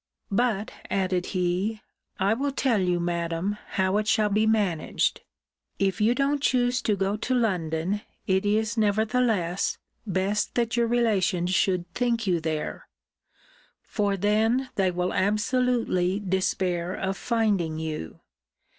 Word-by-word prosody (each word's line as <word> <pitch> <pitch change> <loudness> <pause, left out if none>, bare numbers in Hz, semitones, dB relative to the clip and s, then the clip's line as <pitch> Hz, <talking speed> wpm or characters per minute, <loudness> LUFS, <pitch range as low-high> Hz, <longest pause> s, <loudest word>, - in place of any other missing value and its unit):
But, 215 -1 0 0.2
added 185 -2 0
he, 185 +4 -1 0.4
I 195 +3 +3
will 275 +5 -1
tell 260 -5 +1
you, 180 -1 +1
Madam, 170 +3 -2 0.2
how 190 +1 +2
it 210 0 -1
shall 215 -2 +3
be 215 +2 +2
managed 200 -8 +1 0.6
If 195 +2 0
you 230 +3 +4
don't 280 +1 +1
choose 250 -2 +2
to 210 - +1
go 195 +1 0
to 255 +4 -1
London, 185 -4 0 0.2
it 190 +1 +2
is, 220 +2 +1
nevertheless, 215 -3 +1 0.3
best 195 +2 0
that 235 -1 0
your 235 -1 +2
relations 195 -7 +1
should 185 -2 +1
think 235 -2 0
you 180 -3 +2
there; 155 -1 -4 1.0
for 205 -2 -1
then 220 +6 +1
they 195 -5 +2
will 180 0 -1
absolutely 210 -2 +1
despair 185 -2 -1
of 195 0 -2
finding 200 -9 0
you. 155 - -5
200 Hz, 130 wpm, -26 LUFS, 180-225 Hz, 1.0 s, you